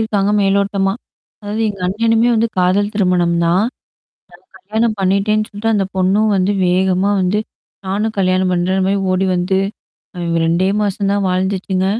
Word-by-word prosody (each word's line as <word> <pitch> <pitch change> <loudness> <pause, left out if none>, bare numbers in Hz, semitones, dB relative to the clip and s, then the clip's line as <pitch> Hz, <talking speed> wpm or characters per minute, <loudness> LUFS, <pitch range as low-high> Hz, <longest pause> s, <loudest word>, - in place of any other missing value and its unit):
இருக்காங்க. 205 -2 0
மேலோட்டமா. 195 0 +1 0.5
அதாவது 210 +2 -3
எங்க 200 -3 -6
அண்ணனுமே 225 +4 +2
வந்து 230 +1 +1
காதல் 200 +4 +1
திருமணம் 180 -4 +1
தான். 180 +5 +2 0.9
நான் - - -17
கல்யாணம் 220 0 0
பண்ணிட்டேன்னு 200 +3 +1
சொல்ட்டு 205 +2 -4
அந்தப் 195 -3 -1
பொண்ணும் 200 +4 +2
வந்து 190 +2 +1
வேகமா 185 +2 +1
வந்து 185 +3 +1 0.5
"நானும் 210 +3 -2
கல்யாணம் 185 -1 +1
பண்றேன்ற." 185 +2 0
மாரி 195 +1 +1
ஓடி 190 +1 +1
வந்து, 180 +2 0 0.6
அ - - -7 0.3
2 170 +3 +1
மாசம் 200 -1 -1
தான் 200 -1 0
வாழ்ந்துச்சுங்க. 190 0 -1
195 Hz, 145 wpm, -17 LUFS, 185-210 Hz, 0.9 s, அண்ணனுமே